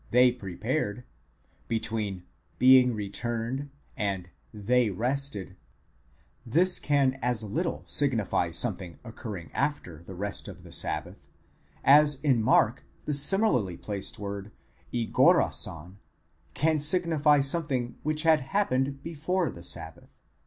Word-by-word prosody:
703 120 - +1 0.7
ἑποστρέψασαι 110 -4 -2 0.3
(being 125 -1 +6
returned) 120 +6 -3 0.3
and 95 -4 -3 0.3
ἡσύχασαν 105 - -10
(they 125 0 +3
rested), 115 -2 -3 0.9
this 175 +10 +2
can 135 -2 +1
as 120 -2 0
little 160 - -3
signify 115 -11 +1
something 90 -1 -2
occurring 110 -7 -8
after 135 - -3
the 90 +2 -11
rest 100 +2 -4
of - - -11
the - - -13
sabbath, - - -3 0.6
as 145 0 +5
in 135 -6 +2
Mark 120 +1 +2 0.2
the 150 - -1
similarly 140 - +4
placed 100 -2 -4
word 100 0 -6 0.4
ἠγόρασαν 100 -6 +1 0.6
can 155 +1 +2
signify 155 -2 +3
something 135 -4 -1
which 155 +1 -2
had 160 -3 +4
happened 135 -4 -1
before 165 0 -2
the 85 - -11
sabbath. 80 -2 -5
125 Hz, 110 wpm, -27 LUFS, 100-145 Hz, 0.9 s, being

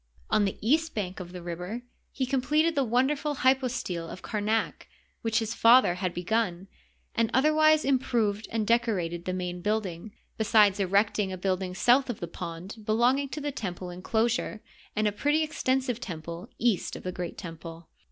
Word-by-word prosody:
On 210 - +4
the 195 - -2
east 320 +5 +2
bank 190 -3 -3
of 175 -1 -8
the 180 -1 -8
river 180 +7 -5 0.3
he 265 - -1
completed 300 +6 +2
the 280 -3 +2
wonderful 270 +5 +1
hypostile 250 -10 +1
of 185 - -9
Kamak 215 +1 -1 0.3
which 225 -1 0
his 225 -1 0
father 230 -5 +6
had 180 0 -2
be 175 - -5
fun, 195 -3 0 0.5
and 230 -1 +1
otherwise 310 +2 +4
improved 230 -6 +1
and 225 -2 0
decorated 205 -7 0
the 185 - -1
main 180 -1 -4
uilding, 205 -2 -2 0.3
besides 210 -2 +4
erecting 200 +1 +2
a 185 - -4
building 185 0 -2
south 255 +6 +4
of 240 - -3
the 170 - -4
pond 170 +5 -7
belonging 245 +6 +2
to 300 - -5
the 290 0 -2
temple 180 -6 -5
inclosure, 220 +4 -1 0.3
and 215 0 +2
a - - +2
pretty 295 +9 +1
extensive 260 -5 -1
temple 170 +4 -7
east 230 -5 0
of - - -8
the 185 - -3
great 180 -2 -5
temple. 165 -1 -9
215 Hz, 170 wpm, -28 LUFS, 180-255 Hz, 0.5 s, father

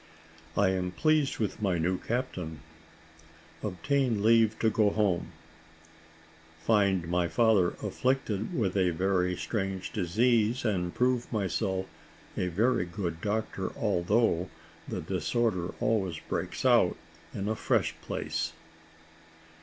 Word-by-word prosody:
I 100 -2 +4
AM 90 -1 -1
PLEASED 155 - +2
WITH 105 -1 -2
MY 95 -4 +1
NEW 90 +3 0
CAPTAIN 90 - -3 1.0
OBTAIN 110 +3 0
LEAVE 110 -1 +4
TO 110 - +2
GO 105 -1 +3
HOME 100 -5 0 1.3
FIND 100 -6 +3
MY 90 0 +1
FATHER 95 +1 +3
AFFLICTED 120 -5 -1
WITH 100 -6 0
A 95 -2 +3
VERY 90 +1 +1
STRANGE 95 -4 -3
DISEASE, 115 +5 +2
AND 90 -5 -1
PROVE 125 -1 +1
MYSELF 95 -2 -1 0.5
A 90 - -1
VERY 100 +3 +1
GOOD 85 -2 -4
DOCTOR, 110 +1 -2
ALTHOUGH 90 -1 +1 0.4
THE - - -3
DISORDER 105 -8 -1
ALWAYS 95 -7 0
BREAKS - - -3
OUT - - +4 0.4
IN 100 0 -3
A 110 - 0
FRESH - - +1
PLACE. - - -3
100 Hz, 115 wpm, -29 LUFS, 90-115 Hz, 1.3 s, I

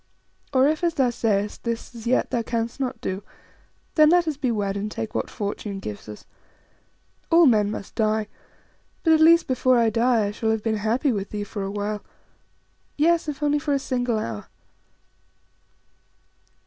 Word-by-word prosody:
Or, 265 0 +4
if 310 +3 0
as 340 -1 +1
thou 260 -4 +2
sayest, 210 -3 -1
this 235 0 -4
as 230 -1 -8
yet 250 - +1
thou 235 - +1
canst 230 +2 -3
not 255 -3 -3
do, 190 +1 -3 0.7
then 305 -1 +6
let 350 0 +4
us 310 - -1
be 270 -2 -1
wed 205 -3 -1
and 205 +1 -3
take 110 - -5
what 110 - -2
fortune 205 -1 -4
gives 105 - -7
us. 105 - -10 1.0
All 335 0 +6
men 215 -6 +4
must 205 -2 -6
die; 215 -1 0 0.8
but 320 - +5
at 315 - +4
least 335 +1 +6
before 255 -1 +2
I 230 -1 +3
die 230 -1 +2
I 200 - -2
shall 220 +1 -2
have 220 -1 0
been 220 -1 0
happy 230 +7 +1
with 200 -3 -3
thee 210 -1 -4
for 205 0 -6
a 195 - -3
while 205 +1 -3 0.9
yes, 330 +2 +3
if 295 0 -5
only 295 0 +2
for 285 0 0
a - - +3
single 245 -3 -1
hour." 115 - -5
230 Hz, 180 wpm, -24 LUFS, 205-275 Hz, 1.0 s, then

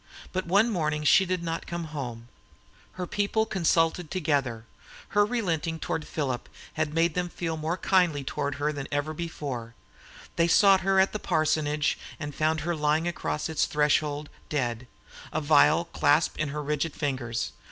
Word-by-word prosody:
But 185 -1 -2
one 200 +6 +4
morning 155 -5 -1
she 190 +5 +5
did 180 -1 -1
not 165 0 -3
come 170 0 -4
home; 120 -5 -5 0.7
her 185 - -4
people 205 +4 0
consulted 165 -3 +1
together; 140 -10 -1 0.4
her 205 - +4
relenting 175 -8 -1
toward 160 0 -3
Philip 130 -5 -3 0.2
had 155 -1 -1
made 165 0 +3
them 180 0 -1
feel 165 -2 -3
more 160 +3 -2
kindly 175 -8 +2
toward 140 +1 -2
her 150 +1 -1
than 140 -2 -5
ever 145 +2 -1
before; 140 -8 -5 0.6
they 170 0 +4
sought 195 +2 +6
her 195 0 +3
at 190 - +3
the 215 - -2
parsonage 150 -3 +1 0.2
and 145 -2 -5
found 155 +2 +1
her 170 +2 -1
lying 155 +2 +1
across 155 -3 -2
its 160 -2 +1
threshold 150 0 +1 0.2
dead, 125 -4 -2 0.4
a 155 - 0
vial 155 +2 +4
clasped 155 -1 +2
in 155 - 0
her 150 +1 -4
rigid 150 +2 -1
fingers. 120 -5 -2
155 Hz, 165 wpm, -27 LUFS, 145-170 Hz, 0.7 s, sought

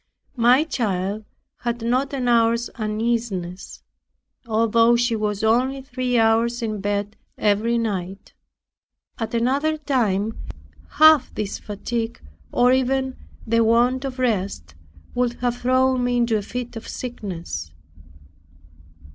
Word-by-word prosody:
My 245 +4 +5
child 210 - -2 0.3
had 235 -1 -3
not 255 +4 +1
an 260 -3 -2
hour's 235 0 +3
uneasiness, 215 -4 -3 0.6
although 230 +1 +3
she 235 -1 +1
was 210 -1 -2
only 255 +5 +2
three 250 -1 -1
hours 230 +2 +2
in 215 -3 -3
bed 205 +1 -2 0.2
every 215 +3 +2
night. 195 -4 -4 0.9
At 225 0 -3
another 275 +7 +1
time 225 -8 0 0.5
half 310 -3 +6
this 210 -2 -3
fatigue, 225 +3 -4 0.3
or 245 +1 +4
even 265 0 +1 0.3
the 230 0 +3
want 240 +4 +3
of 270 -1 -5
rest, 200 - -1 0.4
would 245 -1 0
have 245 0 -2
thrown 255 0 +2
me 245 0 +1
into 235 -2 +2
a 210 - 0
fit 245 +3 -6
of 225 - -8
sickness. 190 - -6
235 Hz, 120 wpm, -22 LUFS, 215-250 Hz, 0.9 s, half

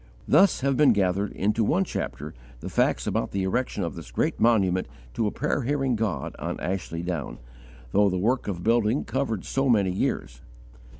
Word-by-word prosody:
Thus 190 -7 +4
have 135 0 +1
been 135 -3 +5
gathered, 100 0 0
into 105 +3 0
one 175 - +2
chapter, - - -5 0.3
the - - -6
facts - - +1
about - - -1
the 100 -1 -2
erection 100 +1 -1
of 85 - -3
this - - -9
great - - -1
monument 95 -6 +3 0.3
to 110 - 0
a - - -1
prayer 150 -1 -1
hearing 135 -1 0
God 105 - -2
on - - -4
Ashley 90 -3 -3
Down, 85 -6 -4 0.5
though 100 0 +4
the 95 - -1
work 120 +8 0
of 90 -4 -4
building 115 +2 +2
covered 130 -7 -2
so 135 0 0
many 100 -6 +3
years. 65 -9 -2
105 Hz, 180 wpm, -26 LUFS, 95-125 Hz, 0.5 s, been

